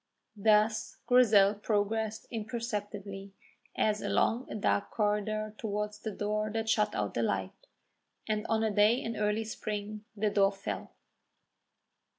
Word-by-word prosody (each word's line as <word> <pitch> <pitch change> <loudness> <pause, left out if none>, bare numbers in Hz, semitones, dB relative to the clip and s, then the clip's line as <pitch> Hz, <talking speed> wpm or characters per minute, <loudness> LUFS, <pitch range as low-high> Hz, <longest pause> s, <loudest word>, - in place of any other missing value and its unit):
Thus 215 +1 +2
Grizel 215 -5 +6
progressed 215 +1 -1
imperceptibly 205 -4 -5 0.4
as 210 -1 +1
along 240 +3 +1
a - - -4
dark 200 -1 +1
corridor 215 0 -1
towards 210 -1 -3
the 220 - -4
door 215 +1 -2
that 225 0 -2
shut 215 -1 +2
out 105 -1 -1
the 120 - 0
light, 95 -4 -2 0.6
and 215 0 -1
on 225 0 +1
a 220 - +1
day 210 +3 +5
in 230 -2 -4
early 210 +1 0
spring 210 -1 -5
the 210 0 +1
door 195 0 +3
fell. 195 0 -5
210 Hz, 135 wpm, -31 LUFS, 205-220 Hz, 0.6 s, Grizel